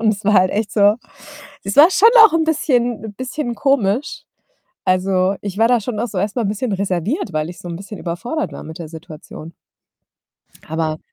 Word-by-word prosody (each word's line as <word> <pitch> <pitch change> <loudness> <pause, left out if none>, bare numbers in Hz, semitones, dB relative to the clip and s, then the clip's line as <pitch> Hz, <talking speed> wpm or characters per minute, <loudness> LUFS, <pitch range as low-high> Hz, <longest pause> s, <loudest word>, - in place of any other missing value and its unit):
Und 220 -1 +3
es 200 - -12
war 210 - +3
halt 185 -1 +4
echt 215 +1 -2
so 205 -1 +4 0.7
es 200 - -3
war 315 +5 +8
schon 425 +4 +6 0.2
auch 425 - +5
'n 330 - +3
bisschen 245 -8 0
bisschen 255 0 -4
komisch. 250 0 0 0.6
Also, 185 +1 +1
ich 200 -1 -5
war 225 +1 +4
da 245 -2 +3
schon 215 0 -4
auch 240 - -2
so 195 - -4
erstmal 215 +4 -1
'n - - -1
bisschen 215 +3 -2
reserviert, 195 - -2
weil 155 0 -2
ich 180 - -12
so 175 - -9
'n 170 - -5
bisschen 200 +2 -9
überfordert 235 - -4
war - - -9
mit 160 +2 -9
der 165 - -7
Situation. 160 0 -11 1.1
Aber 155 0 -2
205 Hz, 195 wpm, -19 LUFS, 185-245 Hz, 1.1 s, war